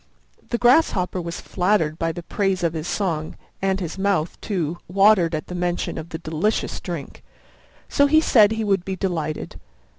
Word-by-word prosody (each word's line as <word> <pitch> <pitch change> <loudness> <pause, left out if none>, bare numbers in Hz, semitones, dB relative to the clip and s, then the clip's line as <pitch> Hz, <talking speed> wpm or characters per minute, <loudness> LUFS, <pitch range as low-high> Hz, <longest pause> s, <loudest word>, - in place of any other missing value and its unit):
The 235 - 0
Grasshopper 235 - +3
was 170 0 -5
flattered 175 -4 0
by 165 0 0
the 175 +1 -7
praise 195 0 -1
of 165 -1 +1
his 160 0 -4
song, 165 -7 -2 0.2
and 195 0 +1
his 175 0 -5
mouth, 190 -5 0
too, 175 -5 -2
watered 190 -3 +4
at 155 - -4
the - - -8
mention 175 -2 -2
of 160 +1 -8
the 160 - -5
delicious 165 +6 -1
drink, 170 -6 -7 0.6
so 285 - +3
he 310 +2 +5
said 220 -8 +5
he 220 0 -2
would 195 -3 +1
be 190 0 -3
delighted. 170 -5 -3
180 Hz, 175 wpm, -22 LUFS, 165-200 Hz, 0.6 s, he